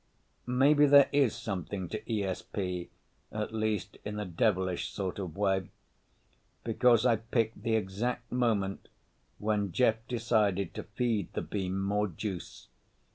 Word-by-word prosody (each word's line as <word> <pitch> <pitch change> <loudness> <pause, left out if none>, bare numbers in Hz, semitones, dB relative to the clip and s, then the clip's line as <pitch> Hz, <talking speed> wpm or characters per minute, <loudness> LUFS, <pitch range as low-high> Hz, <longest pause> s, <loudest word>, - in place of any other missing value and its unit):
Maybe 145 +4 +5
there 140 -1 +8
is 140 -5 +3
something 95 -4 -4
to 110 - -3
ESP—at 100 +1 -4
least 110 -3 -1
in 105 0 -4
a 105 - -2
devilish 95 0 0
sort 95 -1 -4
of 95 -2 -5
way—because 105 +4 -1
I 120 -3 +4
picked 115 -1 -1
the 115 0 +1
exact 110 +4 -2
moment 110 -6 0 0.5
when 105 -2 0
Jeff 110 +3 +3
decided 105 -6 +1
to - - -4
feed 110 -4 -1
the - - -2
beam 95 -2 -2
more 105 +2 +1
juice. 95 +1 -6
105 Hz, 125 wpm, -30 LUFS, 95-115 Hz, 0.5 s, there